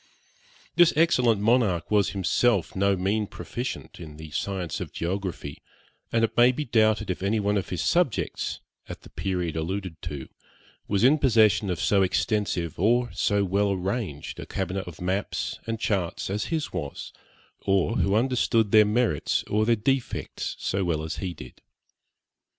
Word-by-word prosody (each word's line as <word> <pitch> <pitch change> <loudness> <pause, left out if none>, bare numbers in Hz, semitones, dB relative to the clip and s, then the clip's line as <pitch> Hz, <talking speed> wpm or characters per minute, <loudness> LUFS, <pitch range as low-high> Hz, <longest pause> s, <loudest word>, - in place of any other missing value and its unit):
This 175 -1 +6
excellent 125 -10 +3
monarch 110 -6 +2
was 100 -2 +3
himself 100 +1 +1
no 100 +1 +2
mean 100 +3 0
proficient 120 0 -6
in 75 -3 -9
the 80 -1 -10
science 95 0 -3
of - - -5
geography; 90 -5 -4 0.5
and 115 0 +2
it 115 - 0
may 120 +1 +6
be 150 +4 -4
doubted 110 -3 +2
if 90 - -5
any 100 +3 +1
one 105 0 +1
of 100 - -2
his 90 - -2
subjects, 175 -9 0 0.3
at - - -7
the - - -14
period 90 -4 -2
alluded 90 +1 -4
to, 75 -5 -6 0.6
was 100 +1 +1
in 145 +5 +5
possession 110 -6 +4
of 90 - -2
so 100 -1 +3
extensive 95 -4 0
or 120 +5 +2
so 100 -1 +1
well 100 +2 +1
arranged 95 - -4
a - - -7
cabinet 95 -1 -3
of 90 0 -10
maps 95 +3 -2
and 115 -1 -2
charts 95 -4 -1
as 105 +1 -1
his 160 -2 -3
was, 70 -1 -5 0.5
or 100 +4 +2
who 100 +1 +2
understood 115 -3 +2
their 110 -1 +7
merits 105 - +1
or 110 +1 0
their 120 - +4
defects 130 +3 -2
so 95 +1 -1
well 80 -3 -1
as 80 - -4
he 90 -3 -4
did. - - -12
100 Hz, 160 wpm, -26 LUFS, 90-115 Hz, 0.6 s, their